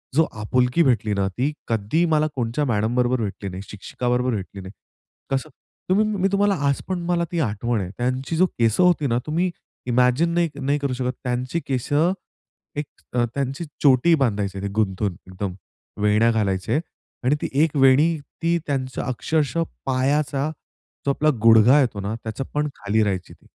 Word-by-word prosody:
जो 160 - +5
आपुलकी 125 +8 +2
भेटली 110 -6 +2
ना, 100 -1 +1
ती 130 +9 -1 0.2
कधी 115 +9 +1
मला 155 0 +3
कोणच्या 125 +4 -1
मॅडम 110 0 0
बरोबर 125 -1 +2
भेटली 100 -1 -4
नाही, 95 +1 -7
शिक्षिक 105 +4 -10
बरोबर 125 +1 +1
भेटली 100 0 -6
नाही. 95 +1 -9 0.6
कसं 135 -1 -1 0.4
तुम्ही 210 +3 +4 0.2
मी 195 - +4
तुम्हाला 200 0 +3
आज 140 - +1
पण 185 -2 -2
मला 175 -1 +1
ती 175 - -1
आठवण 115 -4 -1
आहे 90 - -4
त्यांची, 130 +5 -1
जो 185 - +5
केस 115 - +2
होती 175 -5 +4
ना 120 0 +1
तुम्ही 175 +4 +1 0.4
इमॅजिन 125 +7 +3
नाही 170 -1 +2
नाही 140 +2 0
करू 140 -2 -1
शकत 125 0 -2
त्यांची 125 +6 -1
केस, 130 -3 -2 0.9
एक 145 0 -2 0.3
त्यांची 135 +6 -1 0.2
चोटी 140 +5 +5
बांधायचे 100 -7 -1
ते 100 - -2
गुंतून 100 -3 0
एकदम 95 0 -4 0.5
वेण्या 105 +3 +4
घालायचे 100 +4 0 0.4
आणि 135 +4 +3
ती - - -1 0.2
एक 160 -2 0
वेणी 140 +5 +5 0.3
ती 170 +1 +3
त्यांचं 130 -2 -2
अक्षरशः 155 +6 0 0.2
पायाचा 140 +2 +1 0.6
जो 140 - +3
आपला 155 +2 +2
गुडघा 115 +5 +7
येतो 115 -6 -1
ना, 105 +3 -3
त्याचं 110 +4 -4
पण 150 0 0
खाली 110 +2 +1
राहायची, 95 -3 -2
ती - - -23
125 Hz, 170 wpm, -23 LUFS, 110-150 Hz, 0.9 s, गुडघा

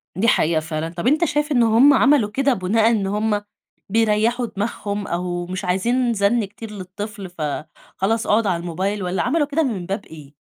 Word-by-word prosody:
دي 200 +6 +1
حقيقة 165 -6 +3
فعلًا. 155 0 -4
طَب 170 +6 -4
أنت 310 +6 +3
شايف 295 -1 -1
إنه 230 -4 +3
هُم 280 +4 +7
عملوا 270 -5 +4
كده 275 +5 +1
بناءً 220 +3 +2
إن 205 -4 0
هُم 210 +1 0 0.5
بيريحوا 225 +3 +2
دماغهم 205 -1 -4
أو 175 0 -3
مش 185 +2 -5
عايزين 235 +7 +1
زن 210 +2 +2
كتير 210 +2 -10
للطفل، 200 0 -7
فخلاص 175 +7 -3
اقعد 215 +1 +3
على 170 -3 0
الموبايل، 190 +4 -2
والّا 180 0 -1
عملوا 305 -3 +1
كده 300 +3 +1
من 215 - -2
باب 195 +4 -4
إيه؟ 150 -3 -13
205 Hz, 180 wpm, -21 LUFS, 180-230 Hz, 0.5 s, هُم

